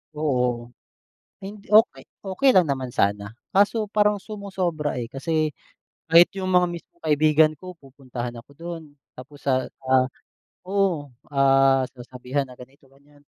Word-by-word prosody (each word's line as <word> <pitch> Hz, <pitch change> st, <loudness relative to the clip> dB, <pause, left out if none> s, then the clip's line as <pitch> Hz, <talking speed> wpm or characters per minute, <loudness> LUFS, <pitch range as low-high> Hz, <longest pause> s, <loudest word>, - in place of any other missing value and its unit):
Oo, 125 Hz, -5 st, -1 dB, 0.7 s
hindi, 205 Hz, +1 st, -9 dB
okey 220 Hz, +2 st, +5 dB, 0.2 s
okey 200 Hz, +8 st, +1 dB
lang 185 Hz, -, +7 dB
naman 130 Hz, -2 st, -2 dB
sana 100 Hz, +2 st, 0 dB, 0.2 s
kaso 205 Hz, +2 st, +2 dB
parang 210 Hz, -1 st, +2 dB
sumosobra, 185 Hz, -, -3 dB
eh, 115 Hz, -, -6 dB
kasi 155 Hz, +2 st, -1 dB, 0.6 s
kahit 170 Hz, +2 st, +7 dB
yung 185 Hz, -1 st, -3 dB
mga 180 Hz, 0 st, +4 dB
mismong 170 Hz, 0 st, -10 dB
kaibigan 155 Hz, 0 st, +4 dB
ko 185 Hz, 0 st, -9 dB
pupuntahan 130 Hz, -4 st, -8 dB
ako 125 Hz, -, -18 dB
do'n 170 Hz, 0 st, -7 dB, 0.3 s
tapos 140 Hz, +3 st, -12 dB
sa, 130 Hz, -2 st, +1 dB, 0.2 s
ah, 130 Hz, 0 st, +3 dB, 0.6 s
oo, 185 Hz, -8 st, 0 dB, 0.2 s
ah, 135 Hz, -1 st, +4 dB
sasabihan 125 Hz, +2 st, -4 dB
na 125 Hz, -, -13 dB
ganito, 135 Hz, +2 st, -16 dB
ganyan. 145 Hz, +1 st, -24 dB
145 Hz, 135 wpm, -24 LUFS, 130-180 Hz, 0.7 s, lang